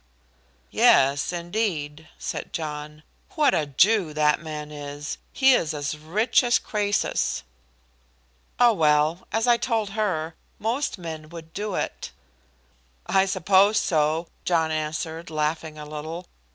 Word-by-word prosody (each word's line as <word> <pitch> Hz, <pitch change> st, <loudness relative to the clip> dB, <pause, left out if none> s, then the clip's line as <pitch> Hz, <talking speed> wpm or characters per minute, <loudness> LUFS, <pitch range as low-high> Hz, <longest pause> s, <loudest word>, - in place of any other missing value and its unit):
"Yes, 140 Hz, +3 st, +4 dB
indeed," 170 Hz, -4 st, -3 dB
said -, -, -5 dB
John. 150 Hz, -1 st, -5 dB, 0.3 s
"What 300 Hz, -3 st, +4 dB
a 150 Hz, -, +1 dB
Jew 170 Hz, +3 st, +3 dB
that 150 Hz, 0 st, +3 dB
man 150 Hz, -2 st, -6 dB
is! 145 Hz, 0 st, -6 dB
He 265 Hz, 0 st, +5 dB
is 160 Hz, -10 st, +1 dB
as 145 Hz, +1 st, -3 dB
rich 180 Hz, -, +1 dB
as 240 Hz, -1 st, +4 dB
Croesus." 205 Hz, -1 st, -1 dB, 1.2 s
"Oh, 240 Hz, -1 st, +6 dB
well, 155 Hz, 0 st, +2 dB
as 225 Hz, +1 st, +1 dB
I 240 Hz, -1 st, +5 dB
told 225 Hz, -4 st, -1 dB
her, 185 Hz, -7 st, -1 dB, 0.2 s
most 235 Hz, +6 st, -1 dB
men 160 Hz, -3 st, -7 dB
would 160 Hz, -1 st, -11 dB
do 205 Hz, -1 st, -3 dB
it." -, -, -4 dB, 0.9 s
"I 190 Hz, 0 st, +3 dB
suppose 195 Hz, +2 st, +4 dB
so," 155 Hz, -1 st, +1 dB, 0.2 s
John 165 Hz, -2 st, +1 dB
answered, 155 Hz, +2 st, -3 dB
laughing 155 Hz, 0 st, -2 dB
a 150 Hz, -, -7 dB
little. 155 Hz, +4 st, -6 dB
160 Hz, 125 wpm, -25 LUFS, 150-205 Hz, 1.2 s, Oh